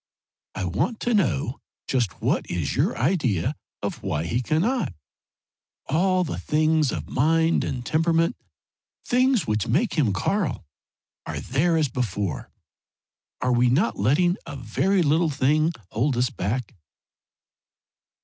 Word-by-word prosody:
"I 95 - -2
want 150 - -1
to 240 - 0
know 130 - 0 0.3
just 120 -8 -1
what - - 0
is 85 -5 -2
your - - +1
idea 130 - +1 0.3
of - - -3
why 75 +1 -2
he 115 +9 -1
cannot. 170 - 0 0.9
All 185 +5 +2
the 160 - -4
things 155 -1 +2
of - - -5
mind 160 +4 +2
and 125 -2 -4
temperament 165 +6 +2 0.7
things 255 -3 +2
which 105 -1 -1
make 165 - +1
him 125 -9 +3
Karl 165 - -1 0.6
are - - -3
there 165 +6 +1
as 155 -2 +2
before. 105 - -3 0.9
Are 125 0 +2
we 120 0 +3
not 115 -3 +1
letting 175 - +3
a 145 - -6
very 170 - +1
little 160 +2 +2
thing 150 +3 +2 0.2
hold 125 +4 0
us 125 0 +1
back?" 110 +5 -3
145 Hz, 130 wpm, -24 LUFS, 120-170 Hz, 0.9 s, him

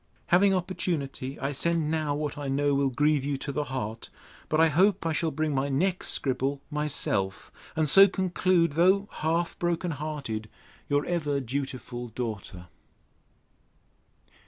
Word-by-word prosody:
Having 195 +2 +5
opportunity, 165 -7 -3
I 135 - -1
send 160 +2 0
now 155 -3 0
what 150 -1 -3
I 145 -1 -5
know 140 +1 +1
will 140 0 +2
grieve 150 +2 +2
you 140 0 -1
to 140 - -5
the 150 +1 -2
heart. 115 -4 -5 0.4
But 155 - +1
I 165 - +6
hope 185 +4 +3
I 165 - +1
shall 160 +2 0
bring 155 -1 -1
my 135 +1 0
next 180 +7 0
scribble 135 +1 0
myself; 130 -10 -1 0.2
and 155 -1 +1
so 195 +7 +8
conclude, 185 -3 +1
though 190 +6 +3
half 165 +2 -1
broken 175 0 0
hearted, 140 -8 -4 0.4
Your 145 0 +2
ever 150 -5 0
dutiful 130 -2 -4
DAUGHTER. 110 -6 -5
150 Hz, 145 wpm, -27 LUFS, 135-170 Hz, 0.4 s, so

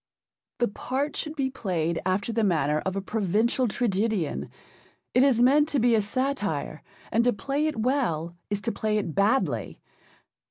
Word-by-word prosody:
The 240 - +2
part 270 +7 -3
should 305 0 -4
be 270 -3 -1
played 170 -9 -1
after 200 +5 0
the 225 0 +1
manner 155 -6 +2
of 190 - -2
a 195 - -1
provincial 220 +5 +1
tragedian. 205 - -1 0.6
It 250 - +5
is 260 -3 +4
meant 290 +4 +5
to 285 - +1
be 240 0 +4
a 220 - +4
satire, 205 - -2 0.3
and 230 - +3
to 245 - +4
play 280 +6 -1
it 305 - -3
well 195 - 0
is 205 -1 -2
to 230 - -1
play 215 -1 -1
it 175 -6 -2
badly. 195 - +1
220 Hz, 165 wpm, -26 LUFS, 185-260 Hz, 0.6 s, It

